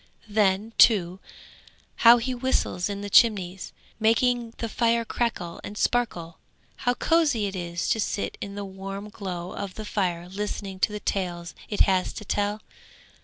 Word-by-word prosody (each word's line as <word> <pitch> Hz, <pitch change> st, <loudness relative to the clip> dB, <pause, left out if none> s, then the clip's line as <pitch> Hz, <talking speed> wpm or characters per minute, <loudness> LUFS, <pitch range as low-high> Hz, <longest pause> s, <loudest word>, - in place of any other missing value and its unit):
Then, 210 Hz, +1 st, +1 dB
too, 185 Hz, -5 st, +5 dB, 0.8 s
how 235 Hz, +1 st, +8 dB
he 245 Hz, +2 st, -2 dB
whistles 245 Hz, -7 st, 0 dB
in 200 Hz, 0 st, -4 dB
the 205 Hz, -, -5 dB
chimneys, 190 Hz, -5 st, +3 dB, 0.3 s
making 230 Hz, +1 st, +2 dB
the 230 Hz, -, -3 dB
fire 230 Hz, +1 st, +1 dB
crackle 215 Hz, -8 st, -3 dB
and 205 Hz, -, -7 dB
sparkle. 180 Hz, -11 st, -1 dB, 0.4 s
How 245 Hz, -1 st, 0 dB
cosy 295 Hz, -7 st, +2 dB
it 195 Hz, -1 st, -4 dB
is 170 Hz, -1 st, -3 dB
to 220 Hz, -, +2 dB
sit 205 Hz, -, -2 dB
in 200 Hz, 0 st, -6 dB
the 205 Hz, 0 st, -4 dB
warm 195 Hz, +2 st, -7 dB
glow 180 Hz, -4 st, -6 dB
of 200 Hz, -2 st, -6 dB
the 215 Hz, -, -6 dB
fire 180 Hz, -4 st, -1 dB
listening 195 Hz, 0 st, -5 dB
to 210 Hz, -, +2 dB
the 210 Hz, -, -4 dB
tales 175 Hz, -4 st, -3 dB, 0.2 s
it 205 Hz, -, -1 dB
has 185 Hz, -2 st, +2 dB
to 210 Hz, -, -8 dB
tell! 205 Hz, +2 st, -1 dB
205 Hz, 160 wpm, -26 LUFS, 185-230 Hz, 0.8 s, how